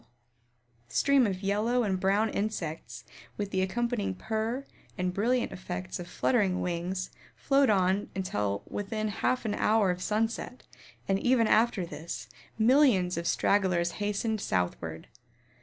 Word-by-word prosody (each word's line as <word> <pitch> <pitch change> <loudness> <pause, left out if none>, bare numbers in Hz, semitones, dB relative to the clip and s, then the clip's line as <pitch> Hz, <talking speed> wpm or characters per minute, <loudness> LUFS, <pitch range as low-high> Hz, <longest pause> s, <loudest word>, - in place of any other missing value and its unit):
The - - -12
stream 275 -4 +4
of 190 -1 -4
yellow 220 +5 +1
and 190 -3 0
brown 200 +4 +2
insects, 160 - -4 0.3
with 205 -1 -3
the 190 - +1
accompanying 230 - -1
purr 225 - -2 0.3
and 180 -1 -1
brilliant 235 +5 +1
effects 90 - -5
of 175 - -6
fluttering 190 -1 +1
wings 180 +1 -3 0.2
flowed 275 -2 +3
on 190 0 +2
until 105 - -2
within 215 +1 -3
a - - -3
half 250 +4 0
an 210 - 0
hour 210 -3 +3
of 180 0 -5
sunset, 225 +5 -2 0.4
and 195 0 +2
even 245 0 +3
after 220 -4 +3
this, 150 -7 -7 0.3
millions 225 -6 +4
of 170 0 -3
stragglers 180 -4 +2
hastened 210 +1 -1
southward. 85 - -2
200 Hz, 140 wpm, -29 LUFS, 180-225 Hz, 0.4 s, stream